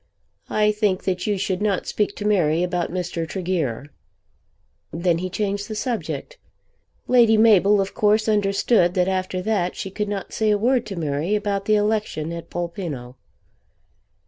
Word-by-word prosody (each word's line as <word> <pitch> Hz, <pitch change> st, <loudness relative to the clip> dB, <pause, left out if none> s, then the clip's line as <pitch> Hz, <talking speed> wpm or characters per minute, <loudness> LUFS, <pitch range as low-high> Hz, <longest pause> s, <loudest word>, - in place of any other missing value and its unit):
I 210 Hz, 0 st, +2 dB
think 210 Hz, -3 st, 0 dB
that 185 Hz, 0 st, -2 dB
you 205 Hz, -1 st, +1 dB
should 190 Hz, 0 st, -2 dB
not 205 Hz, -3 st, 0 dB
speak 205 Hz, -1 st, -1 dB
to 205 Hz, -, -6 dB
Mary 175 Hz, -5 st, +2 dB
about 180 Hz, -1 st, -1 dB
Mr. 175 Hz, -2 st, -3 dB
Tregear." 160 Hz, -, -2 dB, 1.0 s
Then 170 Hz, 0 st, 0 dB
he 185 Hz, +1 st, -3 dB
changed 200 Hz, +1 st, -2 dB
the 215 Hz, -, -5 dB
subject. 240 Hz, -, -4 dB, 0.7 s
Lady 235 Hz, -3 st, +5 dB
Mabel 210 Hz, -2 st, +5 dB
of 195 Hz, 0 st, -1 dB
course 215 Hz, +1 st, +2 dB
understood 200 Hz, -2 st, +2 dB
that 180 Hz, -1 st, +2 dB
after 185 Hz, -1 st, -2 dB
that 195 Hz, -4 st, 0 dB
she 195 Hz, -, -5 dB
could 210 Hz, +1 st, -3 dB
not 200 Hz, -2 st, -5 dB
say 220 Hz, -1 st, +1 dB
a 210 Hz, -, +3 dB
word 245 Hz, +3 st, +1 dB
to 195 Hz, -, -5 dB
Mary 160 Hz, +4 st, -1 dB
about 200 Hz, -1 st, -2 dB
the 215 Hz, -, +3 dB
election 210 Hz, -7 st, -1 dB
at 170 Hz, 0 st, -7 dB
Polpenno. 170 Hz, -8 st, -5 dB
195 Hz, 160 wpm, -22 LUFS, 175-210 Hz, 1.0 s, Lady